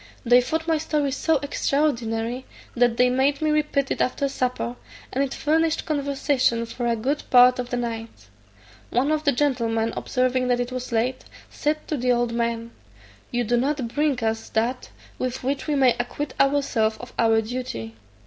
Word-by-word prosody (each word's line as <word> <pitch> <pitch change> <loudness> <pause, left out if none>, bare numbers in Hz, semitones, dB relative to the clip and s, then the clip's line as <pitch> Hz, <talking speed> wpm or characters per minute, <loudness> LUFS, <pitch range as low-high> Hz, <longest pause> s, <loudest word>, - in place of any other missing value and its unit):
They 245 +1 +6
thought 320 +6 -2
my 320 -1 +2
story 300 -3 0
so 315 +3 +1
extraordinary, 250 -4 -1 0.3
that 240 -1 +3
they 250 - +5
made 265 +3 +2
me 310 -1 +1
repeat 300 -2 0
it - - -1
after 275 +2 0
supper, 250 -2 -2 0.4
and 270 - +1
it 275 - -3
furnished 320 +3 +1
conversation 280 -5 +1
for 240 +1 -4
a 235 - +2
good 270 +7 -1
part 250 0 +6
of 245 -1 -3
the 245 - -1
night. 225 - -5 0.6
One 265 +5 +1
of 310 0 0
the 285 - +5
gentlemen 230 -5 0
observing 255 0 0
that 245 -1 +2
it 245 +1 -2
was 255 -1 -5
late, 240 +3 -1 0.3
said 305 +1 -2
to 305 - -1
the 250 0 +1
old 240 -1 +1
man, 235 0 -2 0.6
"You 245 -1 0
do 240 +2 +1
not 265 -1 0
bring 285 -2 0
us 225 0 -1
that 235 +3 -1 0.3
with 255 0 -3
which 275 +3 -2
we 300 - +1
may 260 -3 +5
acquit 260 +3 -3
ourselves 275 -6 +2
of 245 - -10
our 225 -1 +4
duty." 215 - -5
250 Hz, 175 wpm, -24 LUFS, 235-280 Hz, 0.6 s, They